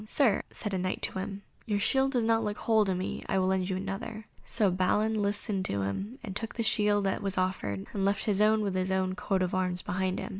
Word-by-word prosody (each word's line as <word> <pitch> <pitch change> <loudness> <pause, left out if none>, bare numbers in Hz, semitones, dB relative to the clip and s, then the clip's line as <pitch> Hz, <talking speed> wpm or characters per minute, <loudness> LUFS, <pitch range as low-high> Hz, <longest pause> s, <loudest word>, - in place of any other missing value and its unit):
"Sir," 230 -4 +3
said 210 -3 -4
a 190 - 0
Knight 185 0 -2
to - - 0
him, 200 +1 -5 0.2
"your 205 -2 +1
shield 270 +5 +2
does 240 -3 +2
not 225 0 +3
look 210 -1 -2
whole 220 -2 +3
to 190 -1 0
me; 185 +1 -3
I - - +2
will 185 - +2
lend 190 0 +1
you 185 - 0
another;" 200 +3 -5 0.2
so 215 -5 +1
Balin 210 +4 +1
listened 205 -1 0
to 100 0 -1
him 195 - -3
and 195 -4 -6
took 225 +2 -4
the 230 - -1
shield 210 -2 +3
that 195 - 0
was 195 -1 -2
offered, 145 - -1
and 200 - -1
left 200 0 +1
his 205 -2 +2
own 215 +1 +4
with 200 -2 -1
his 185 0 0
own 190 0 +1
coat 190 -1 0
of 180 - -2
arms 180 -1 0
behind 185 0 -1
him. - - -4
195 Hz, 250 wpm, -29 LUFS, 185-215 Hz, 0.2 s, own